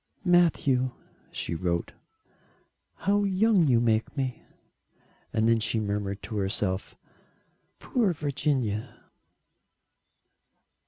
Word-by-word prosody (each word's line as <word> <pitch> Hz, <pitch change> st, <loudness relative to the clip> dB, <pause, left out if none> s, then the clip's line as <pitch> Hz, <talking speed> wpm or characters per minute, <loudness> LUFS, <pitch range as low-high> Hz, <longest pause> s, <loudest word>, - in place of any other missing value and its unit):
"Matthew," 145 Hz, -8 st, +3 dB, 0.4 s
she -, -, -4 dB
wrote, 85 Hz, 0 st, -2 dB, 1.0 s
"how 205 Hz, +1 st, +1 dB
young 195 Hz, -2 st, +3 dB
you 120 Hz, -3 st, +4 dB
make 115 Hz, +3 st, 0 dB
me." 130 Hz, -2 st, -2 dB, 0.9 s
And 110 Hz, 0 st, +1 dB
then 115 Hz, 0 st, +4 dB
she 110 Hz, +1 st, 0 dB
murmured 100 Hz, -1 st, -3 dB
to 110 Hz, -, -5 dB
herself: 95 Hz, -1 st, -1 dB, 0.8 s
"Poor 225 Hz, -7 st, +1 dB
Virginia!" 135 Hz, -7 st, -1 dB
120 Hz, 90 wpm, -27 LUFS, 105-165 Hz, 1.0 s, you